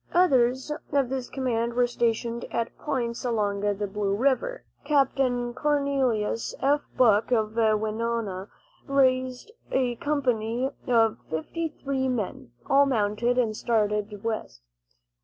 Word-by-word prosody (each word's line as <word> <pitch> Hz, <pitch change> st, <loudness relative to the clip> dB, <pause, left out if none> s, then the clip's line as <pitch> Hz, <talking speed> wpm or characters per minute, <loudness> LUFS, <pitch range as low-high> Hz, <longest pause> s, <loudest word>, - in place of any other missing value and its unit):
Others 260 Hz, -6 st, +3 dB, 0.2 s
of 280 Hz, -3 st, +2 dB
this 260 Hz, -1 st, -3 dB
command 235 Hz, -3 st, -1 dB
were 245 Hz, 0 st, +4 dB
stationed 235 Hz, 0 st, -1 dB
at 230 Hz, 0 st, -2 dB
points 240 Hz, -5 st, -2 dB
along 210 Hz, -5 st, 0 dB
the 205 Hz, 0 st, -1 dB
Blue 200 Hz, 0 st, -1 dB
Earth -, -, -5 dB
river. 280 Hz, -, +1 dB, 0.2 s
Capt. 280 Hz, -3 st, +2 dB
Cornelius 255 Hz, -2 st, 0 dB
F. 285 Hz, +2 st, +2 dB, 0.2 s
Buck 220 Hz, -2 st, +4 dB
of 220 Hz, -3 st, +1 dB
Winona 220 Hz, -2 st, 0 dB, 0.4 s
raised 260 Hz, -, +1 dB, 0.2 s
a 245 Hz, -3 st, +1 dB
company 250 Hz, -3 st, 0 dB, 0.2 s
of 225 Hz, -3 st, +3 dB
fifty 320 Hz, -, -3 dB
three 270 Hz, -1 st, 0 dB
men, 225 Hz, -, -3 dB, 0.2 s
all 280 Hz, +1 st, +5 dB
mounted, 235 Hz, 0 st, +1 dB
and 225 Hz, -4 st, +1 dB
started 210 Hz, -2 st, -1 dB
west. 215 Hz, -, -4 dB
240 Hz, 120 wpm, -26 LUFS, 215-265 Hz, 0.4 s, all